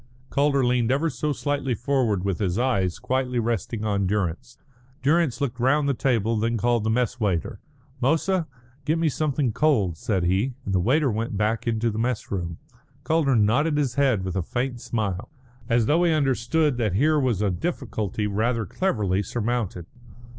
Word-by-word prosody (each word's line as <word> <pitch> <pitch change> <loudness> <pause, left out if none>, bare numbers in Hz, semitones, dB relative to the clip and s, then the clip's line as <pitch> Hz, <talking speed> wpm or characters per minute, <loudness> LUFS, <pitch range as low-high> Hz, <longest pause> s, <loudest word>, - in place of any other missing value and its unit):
Calder 140 -2 +2
leaned 125 -1 +2
ever 150 +4 +1
so 140 +5 -2
slightly 140 -3 -1
forward 115 -7 0
with 95 -3 -1
his 95 -3 0
eyes 100 -8 +1
quietly 130 -1 -1
resting 115 -1 -2
on 100 -2 0
Durrance. 105 +5 -2 0.5
Durrance 155 -2 +2
looked 130 -4 -2
round 140 +4 +2
the 140 - +2
table, 115 -4 +1
and 110 - -1
then 115 +1 0
called 120 0 +1
the 110 - 0
mess 125 +2 0
waiter. 95 -7 -1 0.4
"Moussa, 165 +6 +1 0.4
get 155 +3 +1
me 165 -1 +2
something 145 -3 0
cold," 120 - +2
said 95 +1 -1
he, 100 +9 +1
and 100 - -2
the 95 - +3
waiter 135 - +2
went 110 -1 -3
back 110 +3 0
into 115 0 +1
the 105 - -4
mess 120 0 -2
room. 85 -4 -3 0.5
Calder 155 -5 +2
nodded 130 +9 +2
his 140 -5 0
head 130 -8 +2
with 95 -2 -4
a 95 - +1
faint 120 +6 -3
smile, 105 -2 -3 0.4
as 115 -1 +3
though 160 +8 +3
he 170 - +3
understood 145 0 +1
that 110 -6 0
here 150 +9 +3
was 120 -7 +1
a 100 - +2
difficulty 110 - -3
rather 110 +3 0
cleverly 100 - 0
surmounted. 110 -4 -2
120 Hz, 175 wpm, -24 LUFS, 105-140 Hz, 0.5 s, the